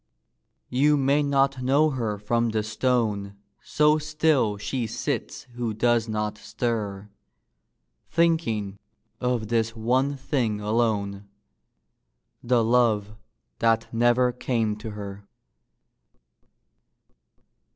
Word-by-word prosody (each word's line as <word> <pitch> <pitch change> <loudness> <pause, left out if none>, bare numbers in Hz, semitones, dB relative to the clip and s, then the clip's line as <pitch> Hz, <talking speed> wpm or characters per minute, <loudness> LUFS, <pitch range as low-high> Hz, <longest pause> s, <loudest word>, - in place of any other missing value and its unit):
You 145 +4 +3
may 140 +2 +2
not 135 -2 +1
know 140 +5 +3
her 115 -6 -2
from 115 +3 0
the 110 -1 -1
stone 110 -3 -1 0.3
So 150 +1 +3
still 150 -8 +1
she 120 +3 -3
sits - - -4
who 120 -3 -3
does 120 0 +2
not 105 0 -2
stir, 105 -4 -3 1.0
Thinking 115 - 0 0.4
of 125 -4 -1
this 115 -1 0
one 130 +5 0
thing 125 -6 -1
alone 105 -2 -1 1.1
The 120 -1 +2
love 110 -3 +2 0.5
that 115 0 +1
never 120 +2 +3
came 115 -3 -1
to 110 +1 -7
her. 100 -1 -8
115 Hz, 100 wpm, -25 LUFS, 105-130 Hz, 1.1 s, You